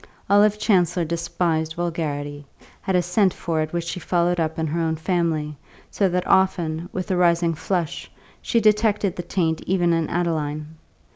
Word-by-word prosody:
Olive 205 +1 +5
Chancellor 180 -5 +2
despised 160 -1 -1
vulgarity, 145 -4 -3 0.4
had 190 - -1
a 180 - +3
scent 185 +2 +2
for 160 -2 -1
it 155 0 -3
which 170 -1 -2
she 170 +2 -4
followed 175 0 +1
up 160 -1 -1
in 160 - -1
her 160 +2 -1
own 160 -1 0
family, 160 -3 -1 0.4
so 195 -2 +1
that 180 0 -1
often, 170 -3 +1
with 185 +1 -4
a - - +2
rising 170 -1 +3
flush, 170 0 -3 0.3
she 230 - +1
detected 210 -3 +2
the - - -3
taint 165 -2 -1
even 175 -2 +2
in 165 -2 0
Adeline. 155 -3 -2
170 Hz, 165 wpm, -23 LUFS, 160-180 Hz, 0.4 s, Olive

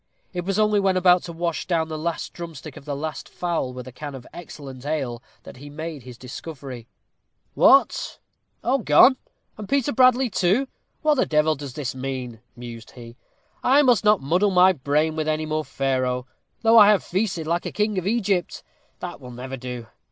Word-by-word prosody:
It 175 -1 -4
was 195 +1 -1
only 210 -1 +3
when 190 -1 +2
about 180 -1 +5
to 170 - -6
wash 170 -1 -3
down 165 -3 +1
the 160 - -5
last 165 +2 -3
drumstick 160 -4 -8
of - - -12
the 145 -2 -3
last 155 +2 -5
fowl 170 -7 -2
with 125 0 -8
a - - -8
can 145 +2 -7
of 125 -2 -10
excellent 140 -6 -10
ale 135 -6 -3 0.2
that - - -12
he 145 +3 -10
made 155 0 -6
this 125 -1 -11
discovery. 130 -2 -8 0.7
"What! - - +4 0.5
all 265 +3 +2
gone? 230 - +6 0.4
And 210 - -7
Peter 280 0 +1
Bradley, 255 +1 +4
too? 210 +5 +1 0.4
What 305 -1 +3
the - - +2
devil 155 0 +3
does 140 -3 -8
this 140 -4 -3
mean?" 130 -3 -5 0.2
mused 120 -2 -10
he. 120 -1 -11 0.5
"I 280 +3 +5
must 245 -7 +4
not 210 -4 +4
muddle 180 +9 +2
my 185 0 +5
brain 150 +2 0
with 155 -1 -2
any 155 0 0
more 155 0 -1
Pharaoh, 130 -3 -1 0.4
though 225 0 +7
I 205 -1 +8
have 210 -2 +4
feasted 180 -4 -2
like 170 +2 -1
a - - -5
king 210 -2 0
of 185 - -5
Egypt. 200 -5 0 0.4
That 175 -5 -6
will 125 - -10
never 125 +2 -7
do. 125 -2 -7
155 Hz, 190 wpm, -23 LUFS, 135-190 Hz, 0.7 s, I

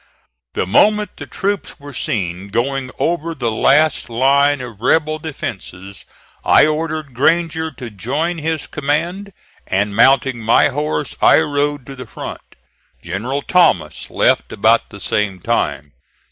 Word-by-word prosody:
The - - 0
moment 210 - +3
the - - -8
troops 200 -3 -3
were 145 0 -10
seen 95 -5 -3
going 130 +5 -2
over 165 0 -1
the 120 -5 -1
last 150 +6 +2
line 140 +4 +3
of 115 -5 -9
rebel 155 +4 +1
defences, 100 - -7 0.4
I - - +6
ordered 155 -2 -2
Granger 160 +4 +1
to 120 -4 -8
join 145 - -2
his 160 0 -2
command, 170 +7 -2 0.4
and 100 +1 0
mounting 135 +1 +4
my 115 +5 +4
horse 150 0 -3
I - - +6
rode 145 -2 -1
to 135 - -9
the 125 -2 -9
front. - - -9 0.5
General 120 +11 -3
Thomas 90 - +2
left - - +1
about - - +2
the - - -11
same 100 -3 -1
time. 75 -10 -2
140 Hz, 135 wpm, -18 LUFS, 115-155 Hz, 0.5 s, I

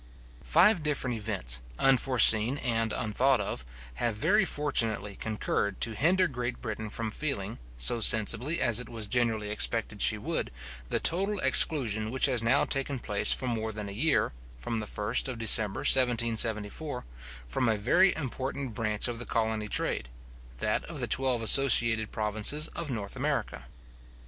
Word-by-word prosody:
Five 190 -2 +3
different 140 -5 -2
events, 100 - -3 0.2
unforeseen 125 -2 +5
and 115 -4 -2
unthought 125 +4 0
of, - - -5 0.4
have 115 -3 -1
very 190 - +1
fortunately 115 - -1
concurred 105 -2 -3
to 115 - +1
hinder 180 - +1
Great 125 -4 -5
Britain 110 -2 -6
from 110 +1 -4
feeling, 115 -7 -4 0.2
so - - +3
sensibly 115 +8 +4
as 120 -3 +3
it 125 - -6
was 115 -2 -5
generally 110 -2 -2
expected 105 - -4
she - - +4
would, - - -4 0.4
the - - 0
total 195 +4 +1
exclusion 110 -8 +1
which 130 +3 +1
has 130 -4 -1
now 120 +5 +1
taken 135 0 -3
place 105 -4 +1
for 130 - +2
more 110 -3 -3
than 105 -1 -7
a - - -8
year 140 - 0 0.2
(from 110 - -4
the 105 - -6
first 105 +5 -2
of 130 -3 -6
December 110 -2 +3
1774) 115 +1 +1 0.4
from 115 - -1
a 110 - 0
very 180 - +2
important 135 -2 -5
branch 105 0 -2
of 120 -1 -6
the 120 - -6
colony 110 -2 -2
trade, - - -2 0.5
that - - -2
of - - -9
the - - -2
twelve 130 -3 -2
associated 115 -3 +5
provinces 110 +8 +1
of 165 -3 -7
North 105 -6 -6
America. - - -4
115 Hz, 155 wpm, -28 LUFS, 110-135 Hz, 0.5 s, unforeseen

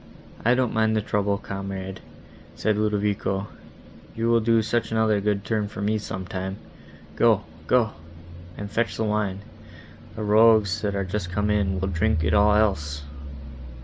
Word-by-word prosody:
"I 120 +2 +4
don't 125 -2 0
mind 110 0 +2
the 110 - +2
trouble, 100 -1 0
comrade," 95 -1 -6 0.6
said 110 0 0
Ludovico, 105 -2 -1 0.7
"you 115 +1 0
will 115 0 +5
do 115 0 +3
such 120 +1 -1
another 110 -2 +2
good 100 -1 0
turn 105 +1 0
for 100 - -9
me, 105 +2 0
some 95 -2 -6
time. 95 +1 -4 0.6
Go—go, 120 -3 +2 0.7
and 100 0 -6
fetch 115 +1 -1
the 110 - 0
wine; 105 -3 -1 0.7
the 110 - -4
rogues, 105 -3 +4
that 100 -1 -1
are 100 -1 -1
just 95 -1 -4
come 105 +2 0
in, 95 -3 +1
will 95 - -1
drink 90 -1 +1
it - - +1
all 105 0 +5
else." 75 -9 0
105 Hz, 155 wpm, -24 LUFS, 95-110 Hz, 0.7 s, will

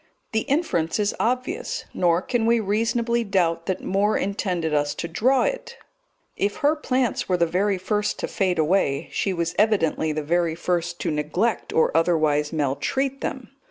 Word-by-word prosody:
The 220 +4 -1
inference 265 - 0
is 205 -1 0
obvious, 255 - -2
nor 175 0 +2
can 235 -3 0
we 235 0 +4
reasonably 230 +3 0
doubt 170 -5 0
that 190 -1 -2
Moore 200 +3 +1
intended 180 -5 -1
us 145 -1 +1
to 170 - -4
draw 255 +10 +2
it; - - -3 0.6
if 200 +1 -1
her 300 +2 +4
plants 255 -8 -1
were 180 - +2
the 170 - +3
very 190 +4 0
first 210 +3 -1
to - - -3
fade 185 -3 0
away, 155 -2 +1
she 195 - -1
was 170 -2 -2
evidently 180 -7 +2
the 155 0 -3
very 170 +1 +1
first 175 0 -2
to - - -1
neglect 150 +10 -1
or 160 - +2
otherwise 155 -3 +2
maltreat 255 - -1
them. - - -5
185 Hz, 165 wpm, -24 LUFS, 165-230 Hz, 0.6 s, we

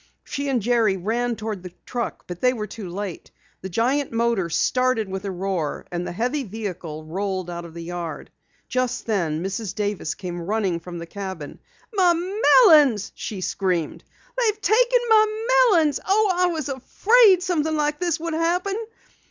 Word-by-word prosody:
She 280 0 -4
and 250 -6 0
Jerry 225 -4 +2
ran 235 +6 -1
toward 215 -3 -5
the 180 -1 -10
truck, 240 -4 -4
but 175 -1 -8
they 250 0 +4
were 215 -4 -4
too 210 -3 -8
late. 190 -1 -6 0.3
The 190 - -6
giant 255 +9 0
motor 230 -6 0
started 250 +4 +1
with 190 +1 -5
a - - -2
roar, 185 -4 -3
and 175 0 -3
the - - -4
heavy 250 +10 -1
vehicle 185 -8 -6
rolled 185 +1 -3
out 170 0 -6
of 165 -1 -12
the 170 - -6
yard. 175 -1 -6 0.4
Just 255 -1 -1
then, 170 -7 -1
Mrs. 195 +1 -4
Davis 205 -6 -2
came 175 -2 -6
running 195 -2 -1
from 175 +1 -8
the 170 - -6
cabin. 190 -5 -7 0.3
"My 365 -4 +4
melons!" 335 - +5
she 200 -4 -6
screamed. 180 -4 -1 0.4
"They've 435 -3 +1
taken - - +4
my 435 0 +3 0.2
melons! 320 -7 +3
Oh, 410 +1 +3
I 360 0 +2
was 320 -5 -2
afraid 380 - +4
something 315 -4 0
like 295 0 0
this 345 -2 0
would 335 0 -3
happen!" 350 +4 0
225 Hz, 170 wpm, -23 LUFS, -, 0.4 s, melons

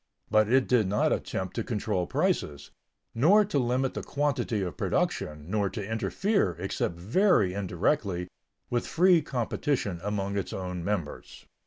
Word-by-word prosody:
But 110 0 +4
it 130 0 +4
did 120 -6 +3
not 105 +2 +2
attempt 95 -1 -4
to 115 - 0
control 105 -6 -2
prices, 70 -1 -1 0.4
nor 190 - +5
to 150 -8 0
limit 125 +1 0
the - - -4
quantity 140 -7 -1
of 90 -5 -4
production, 75 +1 -1
nor 100 +1 0
to 105 -2 -5
interfere, 115 - 0
except 90 -1 -2
very 105 - +2
indirectly, 95 - -1 0.4
with 120 -1 0
free 180 -1 +4
competition 125 - -2
among 100 -1 -2
its 95 - -5
own 90 -2 -4
members. 90 -6 -4
105 Hz, 145 wpm, -28 LUFS, 90-130 Hz, 0.4 s, nor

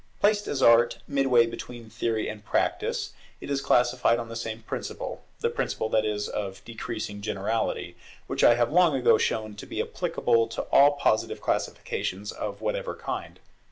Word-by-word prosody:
Placed 205 0 +2
as 135 -2 -1
Art 115 0 +6
is, - - -22
midway 135 -4 +4
between 115 0 -8
Theory 110 0 -1
and 105 -1 -7
Practice, - - -1 0.3
it - - -7
is 140 -1 0
classified 120 -2 +3
on 115 -1 -5
the 115 - -7
same 115 0 -5
principle, - - -5 0.2
the - - +2
principle, 110 - -2
that 110 0 +2
is 105 -1 -1
of 95 -2 -5
decreasing 110 -3 -5
generality, 100 +2 -2 0.3
which - - -2
I 120 - +7
have 120 +1 +1
long 175 -4 +5
ago 130 -2 +4
shown 110 -1 -1
to - - -9
be - - -5
applicable 115 0 +1
to 115 - -4
all 145 +1 +7
Positive 140 -6 0
classifications 100 +3 -2
of 100 0 -5
whatever 105 -1 -2
kind. - - -6
115 Hz, 170 wpm, -27 LUFS, 110-125 Hz, 0.3 s, I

